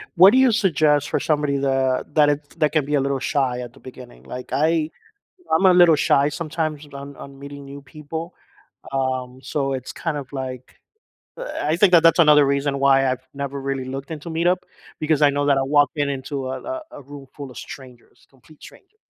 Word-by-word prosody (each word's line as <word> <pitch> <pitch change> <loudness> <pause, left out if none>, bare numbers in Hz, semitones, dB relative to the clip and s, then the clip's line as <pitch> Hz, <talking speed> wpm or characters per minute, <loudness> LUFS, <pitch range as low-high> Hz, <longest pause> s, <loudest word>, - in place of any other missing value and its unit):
What 190 +3 +8
do 255 - +3
you 260 -2 +5
suggest 155 - +2
for - - 0
somebody 150 -2 0
that 135 -1 0
that 150 -2 +5
if 145 0 -2
that 150 - +2
can 155 -3 +1
be 150 +1 -1
a 140 - +2
little 135 0 -1
shy 130 -2 -1
at 120 -1 -8
the 135 - -18
beginning? 125 -1 -13
Like, 125 0 -8
I 155 +3 +1 0.7
I'm 180 - +2
a 185 - +7
little 175 -3 +6
shy 140 0 +2
sometimes 155 -1 -4
on 140 0 -9
on 140 0 -12
meeting 140 0 -10
new 140 +1 -10
people. 155 +4 -8 0.6
Um, 130 -1 -2
so 135 +1 -2
it's 130 -1 -6
kind 165 -3 -4
of 140 -2 -7
like, 130 -2 -7 0.6
uh, - - -6
I 155 +2 0
think 185 0 +4
that 165 -2 +7
that's 165 +1 +5
another 150 -3 +6
reason 140 0 0
why 135 -1 +4
I've 130 0 -4
never, 140 0 -5
really 135 -1 -3
looked 135 +3 -7
into 155 +1 -7
Meetup 170 +3 +1 0.4
because 155 -1 0
I 145 - +6
know 145 0 -1
that 140 -1 +3
I - - +1
walk 145 0 +3
in 145 -1 0
into 135 -1 -4
a 130 - -5
a 325 0 -5
a - - -10
room 140 0 -12
full 140 -2 -8
of - - -13
strangers, 125 -3 -12
complete 135 +3 -22
strangers. 395 +2 -16
140 Hz, 210 wpm, -22 LUFS, 135-155 Hz, 0.7 s, What